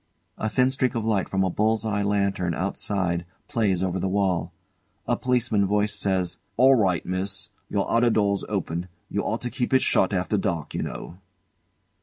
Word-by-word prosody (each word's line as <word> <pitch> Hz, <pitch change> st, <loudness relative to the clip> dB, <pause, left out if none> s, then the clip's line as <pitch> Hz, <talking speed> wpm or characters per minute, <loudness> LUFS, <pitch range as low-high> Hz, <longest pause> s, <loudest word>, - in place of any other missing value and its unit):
A 110 Hz, -, 0 dB
thin 125 Hz, +4 st, +3 dB
streak 130 Hz, -2 st, 0 dB
of 115 Hz, -2 st, -1 dB
light 105 Hz, -4 st, +1 dB
from 95 Hz, 0 st, +1 dB
a 95 Hz, -, 0 dB
bull's 110 Hz, +3 st, +1 dB
eye 105 Hz, -2 st, 0 dB
lantern 100 Hz, -4 st, 0 dB
outside 95 Hz, -1 st, -1 dB, 0.2 s
plays 100 Hz, -6 st, +1 dB
over 95 Hz, 0 st, -1 dB
the 95 Hz, -, -1 dB
wall. 95 Hz, -4 st, 0 dB, 0.5 s
A -, -, +1 dB
Policeman's 120 Hz, -5 st, +1 dB
voice 105 Hz, +1 st, +1 dB
says: 95 Hz, -4 st, -1 dB, 0.2 s
"All 130 Hz, +3 st, +7 dB
right, 95 Hz, -8 st, +2 dB
Miss. 95 Hz, +1 st, -3 dB, 0.2 s
Your 100 Hz, -1 st, 0 dB
outer 120 Hz, +1 st, +3 dB
door's 100 Hz, -3 st, +1 dB
open. 90 Hz, -3 st, -2 dB, 0.2 s
You -, -, -1 dB
ought 110 Hz, +2 st, -2 dB
to 120 Hz, -, -3 dB
keep 125 Hz, 0 st, 0 dB
it 130 Hz, -, +4 dB
shut 95 Hz, -, +3 dB
after 95 Hz, +2 st, 0 dB
dark, 85 Hz, -6 st, -2 dB
you -, -, -2 dB
know." 90 Hz, -, -6 dB
100 Hz, 180 wpm, -25 LUFS, 95-110 Hz, 0.5 s, All